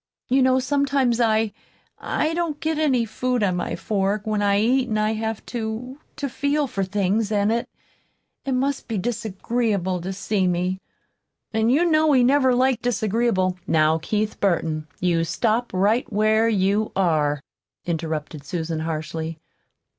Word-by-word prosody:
"You 265 +2 +4
know 260 0 +4
sometimes 270 -2 +1
I 220 -2 +2 0.5
I 315 - -1
don't 330 -3 -2
get 315 -1 -1
any 260 -7 +2
food 250 +1 -1
on 185 -3 +1
my - - -2
fork, 205 0 -1
when 215 -1 0
I 200 0 +3
eat, 250 +4 +2
an' 215 - 0
I 215 +1 +1
have 220 0 -3
to 240 +4 -4 0.2
to 285 - -3
feel 285 +3 0
for 200 -7 -2
things, 200 +2 0
an' 205 0 +2
it 235 +1 -1 0.7
it 270 - -2
must 270 +2 -1
be 225 - -2
disagreeable 205 -3 -1
to 185 +3 -4
see 195 0 0
me. 180 +1 -1 0.7
An' 220 +1 +2
you 295 +8 +4
know 310 -2 +4
he 255 -2 +5
never 260 0 +4
liked 255 -1 +2
disagreeable 215 -5 0
" - - -37
"Now, 155 +1 +3
Keith 215 +5 -2
Burton, 160 -5 0
you 170 -2 +1
stop 225 +8 0
right 205 +7 +1
where 215 +2 +3
you 205 +1 +1
are," 155 -6 +2 0.5
interrupted 160 -3 -3
Susan 160 +1 -3
harshly. 160 0 -4
215 Hz, 155 wpm, -23 LUFS, 185-250 Hz, 0.7 s, he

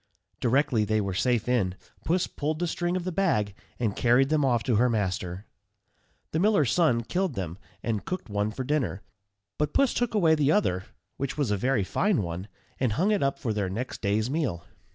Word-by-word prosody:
Directly 125 -2 +2
they 110 +1 +1
were 100 -2 -1
safe 120 +3 +1
in, 105 -8 +1 0.3
Puss 175 +2 +2
pulled 155 +1 -3
the 175 - -1
string 175 +1 -1
of 180 - -3
the 185 - -2
bag, 135 - +1 0.3
and 110 -5 0
carried 125 +3 +3
them 155 -1 +2
off 120 -4 +2
to 115 -3 +2
her 125 +3 +4
master. 95 -3 -2 0.9
The 160 - 0
miller's 180 - +3
son 140 -10 +3
killed 180 +2 -1
them, 90 -2 -4 0.2
and 110 -3 -1
cooked 185 -8 -4
one 105 0 -1
for 120 +5 -4
dinner; 130 -7 -1 0.6
but 150 -1 0
Puss 275 -3 +4
took 245 -2 -1
away 170 -6 +5
the 150 -2 +3
other, 95 - +1 0.3
which 135 +1 -3
was 140 -8 0
a - - +3
very 125 +1 +1
fine 190 - +1
one, 85 +3 -5 0.3
and 125 -5 +1
hung 185 - +2
it 205 - +2
up 140 0 +1
for 115 -6 -2
their 100 -3 -1
next 115 +7 -4
day's 105 +2 +1
meal. 130 - -2
125 Hz, 200 wpm, -27 LUFS, 105-155 Hz, 0.9 s, away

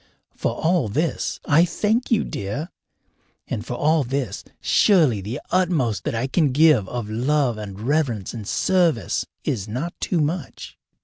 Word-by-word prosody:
For - - -1
all 165 -6 +1
this 155 +11 -1
I 160 +3 +5
thank 210 +7 0
you, 225 -3 +3
dear, 140 - -4 0.8
and 105 - -3
for 125 - -5
all 155 +3 +2
this 130 -5 -3 0.2
surely 155 - +3
the 110 +9 -5
utmost 160 - +1
that - - -1
I 115 +3 0
can 145 +1 +2
give 145 -8 +4
of 120 -3 -4
love 125 +1 0
and 100 -2 -7
reverence 120 - -1
and 110 -4 -7
service 170 - +1 0.2
is 105 -4 -2
not 130 +11 -4
too 175 - 0
much. 155 0 -3
140 Hz, 150 wpm, -22 LUFS, 115-165 Hz, 0.8 s, I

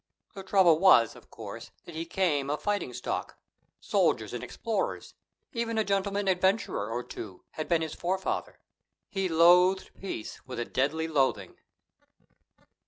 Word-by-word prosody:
The 195 - -7
trouble 190 -4 +4
was, 165 - +6
of - - -16
course, - - -9 0.2
that 170 - -10
he 160 +1 -4
came 150 -7 0
of 150 +1 -2
fighting 205 0 -1
stock: - - -4 0.4
soldiers - - +1
and - - -4
explorers, - - -3 0.4
even 230 -2 -2
a 220 - +3
gentleman 200 0 0
adventurer 190 - +1
or 120 +2 -3
two, 95 -7 -9
had 155 - -5
been 165 -2 +2
his 160 - -4
forefather. 190 +2 -2 0.5
He 195 -2 -1
loathed 180 +3 +5
peace 185 - -6
with 130 -2 -8
a 120 - -1
deadly 155 +7 0
loathing. 140 -4 0
175 Hz, 145 wpm, -29 LUFS, 150-195 Hz, 0.5 s, was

